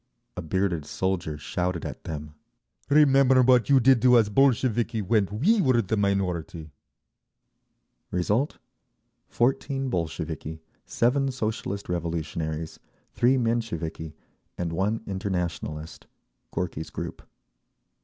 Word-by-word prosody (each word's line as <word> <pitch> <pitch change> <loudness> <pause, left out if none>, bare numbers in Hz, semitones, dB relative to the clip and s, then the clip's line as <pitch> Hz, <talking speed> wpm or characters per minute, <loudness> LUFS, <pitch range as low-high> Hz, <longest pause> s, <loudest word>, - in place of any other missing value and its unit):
A 90 - -4
bearded 85 -1 -1
soldier 90 -5 -2
shouted 90 +3 -3
at - - -7
them, 75 -1 -6 0.6
"Remember 135 -3 +5
what 125 0 +4
you 135 -1 +6
did 130 -1 +5
to 125 -1 +6
us 110 -3 +3
Bolsheviki 120 -2 +2
when 105 0 +2
we 190 - +3
were 130 -7 +3
the 110 0 0
minority!" 90 -6 -1 1.4
Result—14 130 - -2
Bolsheviki, 80 -2 -4 0.3
7 135 +3 +1
Socialist 110 -5 -3
Revolutionaries, 80 -2 -3 0.3
3 130 +2 +3
Mensheviki 85 -10 -2 0.4
and 85 -2 -3
1 100 +6 0
Internationalist 90 -5 -4 0.4
(Gorky's 80 -3 -4
group). - - -6
100 Hz, 100 wpm, -26 LUFS, 85-125 Hz, 1.4 s, you